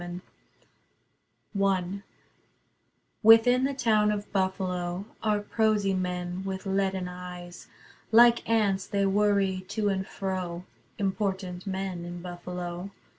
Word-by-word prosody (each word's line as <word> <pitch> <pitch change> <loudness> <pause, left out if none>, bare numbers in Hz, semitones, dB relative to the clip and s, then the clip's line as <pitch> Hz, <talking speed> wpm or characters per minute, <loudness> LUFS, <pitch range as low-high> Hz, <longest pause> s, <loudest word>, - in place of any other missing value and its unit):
Niagara 175 +1 -6 1.7
I 200 - -6 1.2
Within 230 +4 +7
the 275 0 -1
town 215 -5 +3
of 205 0 -4
Buffalo 185 -1 -1 0.2
Are 210 -1 +1
prosy 210 -2 +1
men 180 0 -3
with 190 0 -5
leaden 190 -1 0
eyes. 180 -1 -9 0.4
Like 235 0 +6
ants 205 -4 +2
they 200 -1 +1
worry 195 -1 +2
to 205 +1 0
and 190 -1 -1
fro, 185 -3 -4 0.3
(Important 190 -2 -2
men, 190 -2 -3
in 175 0 -6
Buffalo.) 180 +1 -6
190 Hz, 110 wpm, -28 LUFS, 180-210 Hz, 1.7 s, Within